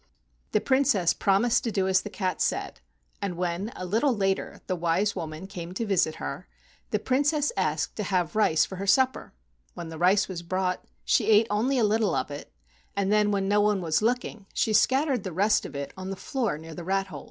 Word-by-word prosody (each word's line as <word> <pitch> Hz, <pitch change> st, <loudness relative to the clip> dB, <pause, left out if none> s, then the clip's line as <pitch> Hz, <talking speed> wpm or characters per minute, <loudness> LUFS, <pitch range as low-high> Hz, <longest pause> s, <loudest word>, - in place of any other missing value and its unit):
The -, -, +3 dB
Princess 260 Hz, -10 st, +2 dB
promised 225 Hz, +5 st, +2 dB
to 230 Hz, -, -1 dB
do 190 Hz, -2 st, 0 dB
as 190 Hz, 0 st, +3 dB
the 210 Hz, -, -7 dB
cat 185 Hz, -4 st, -2 dB
said, -, -, -1 dB, 0.4 s
and 185 Hz, -4 st, -3 dB
when, 180 Hz, +4 st, -2 dB
a 185 Hz, -, -5 dB
little 230 Hz, +7 st, +1 dB
later, 195 Hz, -1 st, -1 dB
the 185 Hz, -, -1 dB
wise 175 Hz, +4 st, 0 dB
woman 155 Hz, +2 st, -5 dB
came 180 Hz, -2 st, -8 dB
to 230 Hz, -, -2 dB
visit 185 Hz, -6 st, +1 dB
her, 70 Hz, -3 st, -6 dB, 0.4 s
the -, -, +1 dB
Princess 290 Hz, +3 st, +1 dB
asked 155 Hz, -5 st, -1 dB
to 210 Hz, -, -1 dB
have 180 Hz, -3 st, 0 dB
rice 165 Hz, -8 st, +3 dB
for 190 Hz, -, -8 dB
her 195 Hz, +2 st, -4 dB
supper. 260 Hz, +5 st, +2 dB, 0.4 s
When 170 Hz, -2 st, -6 dB
the 160 Hz, -1 st, -8 dB
rice 190 Hz, +4 st, +4 dB
was 180 Hz, -3 st, -5 dB
brought 185 Hz, +1 st, -2 dB, 0.2 s
she 215 Hz, -, +2 dB
ate 220 Hz, +1 st, +6 dB
only 240 Hz, +6 st, +1 dB
a 240 Hz, -, +3 dB
little 215 Hz, -2 st, +2 dB
of -, -, -2 dB
it, 145 Hz, -, -8 dB, 0.4 s
and 200 Hz, 0 st, 0 dB
then, 210 Hz, 0 st, +3 dB
when 195 Hz, -1 st, 0 dB
no 205 Hz, +1 st, +3 dB
one 210 Hz, -1 st, +2 dB
was 165 Hz, -1 st, 0 dB
looking, 225 Hz, -3 st, -1 dB
she 220 Hz, -, +1 dB
scattered 265 Hz, +1 st, +3 dB
the 190 Hz, -, -4 dB
rest 200 Hz, +6 st, +2 dB
of -, -, -12 dB
it 140 Hz, 0 st, -5 dB
on 190 Hz, 0 st, -6 dB
the 195 Hz, -, -3 dB
floor 230 Hz, -, -2 dB
near 160 Hz, +1 st, -10 dB
the 175 Hz, -, -7 dB
rat 195 Hz, +2 st, 0 dB
holes. 160 Hz, -7 st, -8 dB
195 Hz, 215 wpm, -27 LUFS, 175-215 Hz, 0.4 s, ate